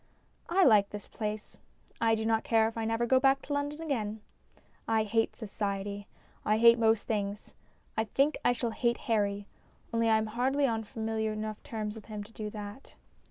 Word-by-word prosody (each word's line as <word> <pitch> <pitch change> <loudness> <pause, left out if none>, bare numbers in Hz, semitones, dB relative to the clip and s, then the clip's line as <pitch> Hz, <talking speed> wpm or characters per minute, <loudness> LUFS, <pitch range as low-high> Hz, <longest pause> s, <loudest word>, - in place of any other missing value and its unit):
I 375 +3 +4
like 210 - +6
this 205 -1 -8
place. 215 -1 -5 0.4
I 225 -1 +4
do 220 0 -3
not 225 0 +2
care 225 -1 +3
if 225 - -6
I 225 -1 -2
never 225 +1 +1
go 260 +2 +4
back 270 0 +3
to 290 - -4
London 290 +2 -2
again. 220 -9 -2 0.7
I 225 -1 +3
hate 225 +1 0
Society; 200 -1 -4 0.4
I 215 +1 +2
hate 235 +1 +7
most 225 -2 +3
things. 205 -1 -3 0.4
I 220 - +1
think 275 +7 +2
I - - +4
shall 240 -1 -1
hate 235 +1 0
Harry, 205 -3 0 0.5
only 230 0 +2
I 220 - +5
am 220 - 0
hardly 260 +6 +1
on 225 -3 -1
familiar 220 0 -2
enough 215 0 -5
terms 215 -2 -4
with 220 -2 -11
him 210 -2 -5
to 210 - -16
do 215 -1 -5
that. 210 +4 -9
220 Hz, 190 wpm, -30 LUFS, 210-235 Hz, 0.7 s, hate